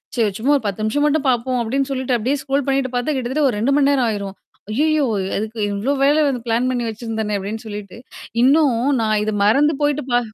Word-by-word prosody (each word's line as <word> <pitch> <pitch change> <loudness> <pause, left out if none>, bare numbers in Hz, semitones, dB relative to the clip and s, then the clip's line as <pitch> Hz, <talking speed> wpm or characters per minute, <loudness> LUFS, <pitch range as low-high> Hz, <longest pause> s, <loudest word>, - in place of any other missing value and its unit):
"சரி 220 -4 +1
சும்மா 270 +6 +1
ஒரு 260 - -8
10 200 +1 -3
நிமிஷம் 290 +7 +1
மட்டும் 295 -2 +1
பார்ப்போம்" 250 +1 0
அப்பிடின்னு 270 +4 -1
சொல்லிட்டு 260 -2 -1
அப்பிடியே 255 +6 -1
ஸ்க்ரோல் 275 0 -1
பண்ணிட்டு 270 -2 0
பார்த்தா 260 +4 -1
கிட்டத்தட்ட 265 +3 0
ஒரு 220 - -3
2:00 265 +6 +1
மணி 280 -1 +3
நேரம் 260 -4 +2
ஆயிரும். 200 -2 -4 0.4
"அய்யயோ! 305 +3 +2 0.3
அதுக்கு 220 +2 -5
இவ்ளோ 220 +8 -1
வேலை 295 +2 +4
வந்து 250 -4 -2
பிளான் 240 +3 +1
பண்ணி 240 -2 -2
வச்சிருந்தேனே" 220 -1 -3
அப்பிடின்னு 210 +4 -6
சொல்லிட்டு 205 -1 -8 0.5
இன்னும் 275 -2 +4 0.2
நான் 215 -1 +1
இத 215 - -1
மறந்து 285 +8 +3
போயிட்டு 290 -1 0
பா 245 - +4
250 Hz, 205 wpm, -20 LUFS, 220-280 Hz, 0.5 s, வேலை